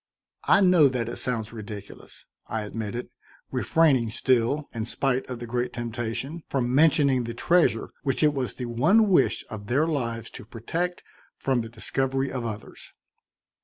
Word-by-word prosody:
"I 200 Hz, -, +5 dB
know 180 Hz, -6 st, +6 dB
that 125 Hz, -3 st, -2 dB
it -, -, -5 dB
sounds 115 Hz, -3 st, -2 dB
ridiculous," 105 Hz, -2 st, -9 dB, 0.2 s
I 110 Hz, -1 st, -3 dB
admitted, 110 Hz, +3 st, -5 dB, 0.4 s
refraining 140 Hz, -8 st, +3 dB
still, 130 Hz, +5 st, +1 dB
in 115 Hz, -2 st, -3 dB
spite 130 Hz, +2 st, -1 dB
of 125 Hz, -, -4 dB
the 120 Hz, -, -7 dB
great 120 Hz, +1 st, -2 dB
temptation, 120 Hz, +6 st, -4 dB
from 125 Hz, -2 st, -1 dB
mentioning 140 Hz, -4 st, +4 dB
the 115 Hz, 0 st, -5 dB
treasure 175 Hz, +8 st, +2 dB
which 135 Hz, +1 st, 0 dB
it 150 Hz, -1 st, +4 dB
was 130 Hz, -3 st, -2 dB
the 125 Hz, -, -5 dB
one 165 Hz, -, +3 dB
wish 185 Hz, -, +3 dB
of 105 Hz, -2 st, -7 dB
their 140 Hz, +7 st, +2 dB
lives 115 Hz, -8 st, -2 dB
to -, -, -9 dB
protect 165 Hz, +11 st, -3 dB, 0.3 s
from 130 Hz, -3 st, 0 dB
the 115 Hz, -, -7 dB
discovery 135 Hz, +4 st, -1 dB
of 125 Hz, -3 st, -3 dB
others. 105 Hz, -1 st, -8 dB
125 Hz, 160 wpm, -26 LUFS, 115-145 Hz, 0.4 s, know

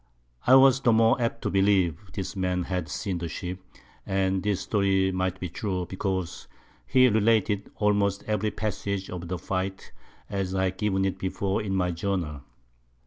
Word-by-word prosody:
I 130 Hz, -, +8 dB
was 135 Hz, 0 st, +6 dB
the 120 Hz, -, +4 dB
more 115 Hz, +2 st, +4 dB
apt 115 Hz, -, -1 dB
to -, -, -1 dB
believe 95 Hz, -4 st, +3 dB, 0.2 s
this 95 Hz, +1 st, -4 dB
Man 90 Hz, -1 st, 0 dB
had 90 Hz, 0 st, -3 dB
seen 100 Hz, -9 st, -3 dB
the 85 Hz, -, -3 dB
Ship, 90 Hz, +2 st, -5 dB, 0.4 s
and 95 Hz, -1 st, 0 dB
this 105 Hz, -2 st, 0 dB
Story 95 Hz, -2 st, +2 dB
might 95 Hz, 0 st, -1 dB
be 90 Hz, -, -3 dB
true, 90 Hz, +1 st, -3 dB
because 95 Hz, -1 st, -3 dB, 0.4 s
he 130 Hz, -, +5 dB
related 110 Hz, -2 st, +2 dB
almost 100 Hz, -1 st, +1 dB
every 105 Hz, 0 st, 0 dB
Passage 100 Hz, -2 st, -3 dB
of 90 Hz, -1 st, -6 dB
the 90 Hz, +1 st, -3 dB
Fight, 95 Hz, +2 st, -4 dB, 0.4 s
as 95 Hz, -2 st, -2 dB
I 95 Hz, -1 st, +1 dB
have 95 Hz, -, -20 dB
given 95 Hz, -2 st, +1 dB
it 95 Hz, 0 st, -2 dB
before 95 Hz, +1 st, -1 dB
in 100 Hz, -2 st, -2 dB
my 90 Hz, -1 st, +1 dB
Journal. 85 Hz, -5 st, -2 dB
95 Hz, 170 wpm, -26 LUFS, 95-105 Hz, 0.4 s, I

